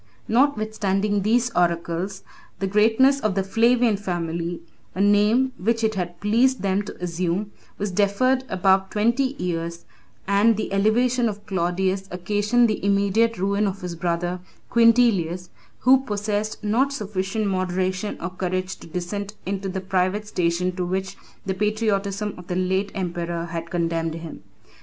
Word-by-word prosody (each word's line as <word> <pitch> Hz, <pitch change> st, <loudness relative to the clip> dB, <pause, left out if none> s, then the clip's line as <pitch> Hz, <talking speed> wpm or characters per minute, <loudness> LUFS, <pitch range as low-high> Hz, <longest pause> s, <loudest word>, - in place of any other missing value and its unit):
] -, -, -34 dB
Notwithstanding 210 Hz, -6 st, +1 dB
these 235 Hz, +4 st, +2 dB
oracles, 175 Hz, +1 st, -1 dB, 0.3 s
the 195 Hz, -, -2 dB
greatness 225 Hz, +7 st, +4 dB
of 215 Hz, -6 st, -1 dB
the 195 Hz, -, +1 dB
Flavian 230 Hz, +2 st, +3 dB
family 170 Hz, -3 st, -3 dB, 0.3 s
(a -, -, -5 dB
name 210 Hz, +6 st, +3 dB
which 230 Hz, +5 st, 0 dB
it 220 Hz, 0 st, +2 dB
had 175 Hz, -3 st, -4 dB
pleased 235 Hz, +3 st, +2 dB
them 195 Hz, 0 st, +1 dB
to 205 Hz, -, -8 dB
assume) 180 Hz, +3 st, -2 dB, 0.3 s
was 205 Hz, -1 st, -2 dB
deferred 210 Hz, +7 st, +2 dB
above 190 Hz, +1 st, +2 dB
twenty 240 Hz, +6 st, +1 dB
years, 170 Hz, -1 st, -3 dB, 0.4 s
and 205 Hz, +3 st, +4 dB
the 215 Hz, -, -3 dB
elevation 235 Hz, +4 st, +2 dB
of 205 Hz, 0 st, -8 dB
Claudius 190 Hz, +1 st, -1 dB
occasioned 205 Hz, +6 st, +2 dB
the 215 Hz, -3 st, -2 dB
immediate 200 Hz, +3 st, +2 dB
ruin 200 Hz, +3 st, +1 dB
of 195 Hz, 0 st, -4 dB
his 180 Hz, -1 st, -5 dB
brother 175 Hz, +1 st, -2 dB, 0.3 s
Quintilius, 225 Hz, -7 st, +3 dB, 0.3 s
who 260 Hz, +2 st, +6 dB
possessed 210 Hz, -1 st, -2 dB
not 240 Hz, +7 st, +2 dB
sufficient 210 Hz, -3 st, -2 dB
moderation 185 Hz, +1 st, -1 dB
or 170 Hz, -, -4 dB
courage 185 Hz, 0 st, -3 dB
to -, -, -13 dB
descend 195 Hz, +5 st, -4 dB
into 195 Hz, 0 st, -3 dB
the 190 Hz, 0 st, -3 dB
private 190 Hz, +2 st, 0 dB
station 180 Hz, -1 st, 0 dB
to 180 Hz, -, -2 dB
which 190 Hz, +2 st, -3 dB, 0.3 s
the 190 Hz, -, -1 dB
patriotism 210 Hz, 0 st, -1 dB
of 180 Hz, -1 st, -11 dB
the 180 Hz, -, -2 dB
late 190 Hz, +2 st, 0 dB
emperor 170 Hz, -2 st, -3 dB
had 170 Hz, 0 st, -5 dB
condemned 165 Hz, -2 st, -1 dB
him. 165 Hz, -1 st, -8 dB
195 Hz, 145 wpm, -23 LUFS, 180-215 Hz, 0.4 s, who